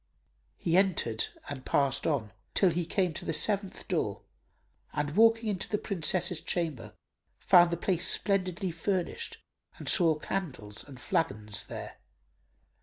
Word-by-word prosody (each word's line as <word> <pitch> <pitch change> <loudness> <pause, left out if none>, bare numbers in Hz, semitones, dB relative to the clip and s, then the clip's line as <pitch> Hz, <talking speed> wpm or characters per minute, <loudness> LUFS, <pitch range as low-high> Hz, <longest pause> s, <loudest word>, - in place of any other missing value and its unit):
He 170 +1 +1
entered 160 - +2 0.2
and 135 -3 -6
passed 140 -2 +1
on, 120 -9 -1 0.2
till 190 -3 +4
he 170 0 -2
came 180 -2 0
to - - -5
the 165 - -2
seventh 200 +2 +1
door - - -1 0.7
and 150 0 -2
walking 225 +1 +5
in 200 -3 -1
to - - -4
the 210 - +1
Princess's 180 -3 0
chamber 145 - -3 0.4
found 175 -2 +6
the 170 - -1
place 180 0 +1
splendidly 185 -2 +1
furnished 180 +2 -2 0.4
and - - -9
saw 165 -5 +4
candles 135 - -4
and 135 -3 -12
flagons 105 -6 -1
there. - - -7
170 Hz, 140 wpm, -30 LUFS, 145-190 Hz, 0.7 s, found